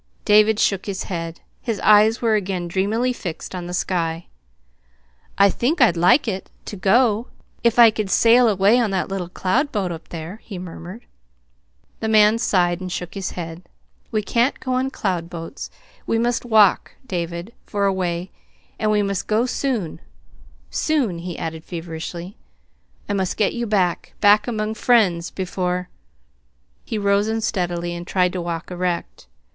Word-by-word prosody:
David 210 0 +5
shook 195 -2 +1
his 195 -1 -3
head. 165 -2 -5 0.2
His 225 -4 -3
eyes 215 +3 +5
were 225 -1 +3
again 190 -4 -1
dreamily 215 +8 0
fixed 175 -8 -6
on 180 -1 -5
the - - -6
sky. 170 -2 -1 1.1
"I 200 0 +6
think 290 +8 0
I'd 235 -9 +5
like 180 - +4
it 190 -3 -3 0.2
to - - -6
go 220 +3 +2 0.4
if 235 -1 +2
I 235 -2 +8
could 215 -2 -3
sail 235 +4 +5
away 205 +4 +4
on 230 -3 +1
that 190 0 -1
little 190 -3 -4
cloud 240 +12 0
boat 195 -5 -1
up 165 -1 -8
there," 170 +5 -7
he 200 - -8
murmured. 180 +5 -9 0.9
The 220 - -2
man 215 0 +5
sighed 180 -5 +1
and 185 -1 -5
shook 180 0 -5
his 195 -2 -4
head. 165 -1 -6 0.5
"We 215 -2 0
can't 235 +6 +1
go 255 - -3
on 260 +1 0
cloud 180 -9 -2
boats. 165 -2 -7 0.4
We 225 - +1
must 240 +1 0
walk, 215 -4 +4
David, 175 0 -4
for 200 -1 0
a 195 - +2
way 180 -1 -3 0.5
and 215 - +1
we 210 -1 +2
must 200 -2 -2
go 220 +3 +2
soon 245 - -2 0.7
soon," 255 - 0
he 175 0 -6
added 160 -1 -5
feverishly. 170 +2 -7 0.7
"I 205 - -1
must 190 -2 -1
get 210 - +2
you 235 -1 -3
back 190 -5 0
back 210 +1 +5
among 215 -2 -2
friends, 200 -8 +2
before 180 -1 -3 0.5
" 65 0 -43
He 220 - -3
rose 200 0 +2
unsteadily, 175 -6 -1
and 175 +1 -7
tried 180 -1 +1
to 180 - -3
walk 170 +1 -5
erect. 175 - -3
195 Hz, 165 wpm, -21 LUFS, 175-220 Hz, 1.1 s, I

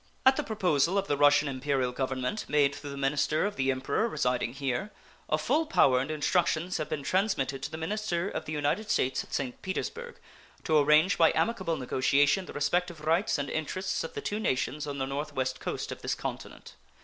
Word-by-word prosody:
At 265 0 +7
the - - 0
proposal 180 -4 +1
of 195 - +1
the 145 - +1
Russian 145 +1 +5
Imperial 135 -1 -1
Government, 130 +8 -2
made 145 -1 +3
through 145 0 -8
the 140 - -7
minister 140 +4 +1
of 205 - -2
the 135 0 0
Emperor 135 - 0
residing 125 - -1
here, 135 +6 -2 0.4
a - - +2
full 320 +1 +1
power 130 - +4
and 135 +3 -3
instructions 165 +2 0
have 155 - -4
been 150 -2 -3
transmitted 140 -6 0
to - - -4
the 160 - -6
minister 175 +1 -2
of - - -4
the - - -6
United 155 +8 -1
States 130 -8 +1
at - - -18
St. 130 -3 -3
Petersburg 475 - -4 0.5
to 160 - +1
arrange 150 +6 +4
by 165 - +6
amicable 190 -8 0
negotiation 140 +7 +2
the - - -8
respective 170 +3 -1
rights 165 +6 +1
and 140 -1 -2
interests 170 +6 -2
of 165 - -7
the - - -3
two 210 - -3
nations 150 -4 -1
on 140 -1 -4
the 135 - -1
North 145 +2 -4
West 130 -1 -2
coast - - -4
of - - -7
this - - -1
continent. - - -7
150 Hz, 200 wpm, -29 LUFS, 135-185 Hz, 0.5 s, At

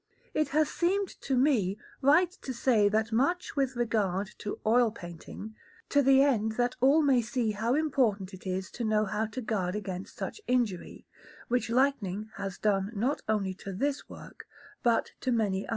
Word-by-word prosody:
It 305 - +1
has 305 +1 +2
seemed 380 +2 +1
to 265 -2 0
me 235 -8 +2 0.2
right 315 +6 +5
to 260 - -4
say 225 -4 +3
that 220 +2 0
much 280 +12 0
with 270 -2 0
regard 205 -5 0
to 205 - -4
oil 235 +2 +4
painting, 195 +2 -9 0.4
to 285 - +4
the 270 0 +6
end 220 -6 +1
that 245 +2 0
all 285 +5 +5
may 265 -4 +4
see 235 -1 -1
how 225 +4 0
important 235 -11 +1
it 190 +1 -9
is 185 0 -3
to 240 - -5
know 215 -1 +2
how 210 +2 -1
to 240 +4 -6
guard 200 -5 -1
against 190 -3 -5
such - - -5
injury, 235 -8 -1 0.4
which 240 -1 0
lightning 220 -5 0
has 195 -2 -4
done 200 -1 +1
not 250 +8 0
only 200 -3 0
to 195 +1 -8
this 280 +8 -2
work, - - -12 0.3
but 235 -2 +2
to 260 - -1
many 205 -5 0
others. - - -14
225 Hz, 180 wpm, -29 LUFS, 205-265 Hz, 0.4 s, the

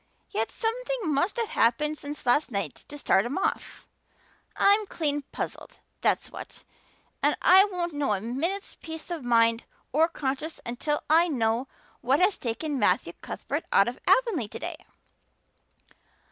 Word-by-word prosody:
Yet 225 +1 -1
something 465 -6 -2
must 350 - 0
have 460 -2 -1
happened 295 +7 +2
since 290 -2 -7
last 280 +5 +3
night 200 -4 -4
to 290 - -9
start 195 -8 +3
him 245 +8 -3
off. 385 - -2 0.7
I'm 405 +1 +4
clean 290 -5 -1
puzzled, - - -6 0.2
that's - - +1
what, - - -10 0.6
and - - +2
I 380 +2 +7
won't 355 -4 -3
know 290 -6 0
a - - -3
minute's 305 - -3
peace 320 +1 -7
of 330 -5 -4
mind 230 -1 +3 0.3
or 315 +3 +4
conscience 300 0 -3
until 270 +5 -2
I 330 +3 +5
know 240 -3 0 0.3
what 265 +3 +2
has 375 +2 +4
taken 265 +5 -2
Matthew - - +2
Cuthbert - - -4
out - - +5
of - - -4
Avonlea 445 - +3
today." - - -5
295 Hz, 145 wpm, -27 LUFS, 245-360 Hz, 0.7 s, I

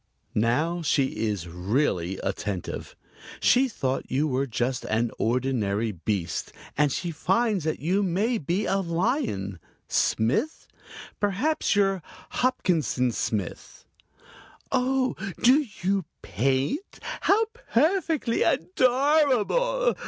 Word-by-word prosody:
Now 150 +11 +1
she 135 -7 +1
is 95 -5 -3
really 90 - -1
attentive. 100 -4 -4 0.4
She 260 +2 +4
thought 135 - -2
you 145 +4 +1
were 135 0 0
just 120 +2 -1
an 115 +1 0
ordinary 115 -3 0
beast, 90 -1 -3 0.2
and 150 -1 +3
she 175 +5 -2
finds 205 +3 +1
that 155 - -1
you 180 +7 +1
may 205 +6 +1
be 175 +8 -1
a 195 - +1
lion. 170 - -1 0.3
Smith? 130 - 0 0.5
Perhaps 210 +8 +1
you're 195 -2 +2 0.3
Hopkinson 165 - +1
Smith. 105 -5 -4 0.9
"Oh, 260 0 +1 0.3
do 270 +4 +5 0.2
you 195 -1 +1 0.2
paint? 135 - -1 0.2
How 435 +3 +4 0.3
perfectly 315 -2 +2
adorable! 285 - +2
170 Hz, 100 wpm, -26 LUFS, -, 0.9 s, do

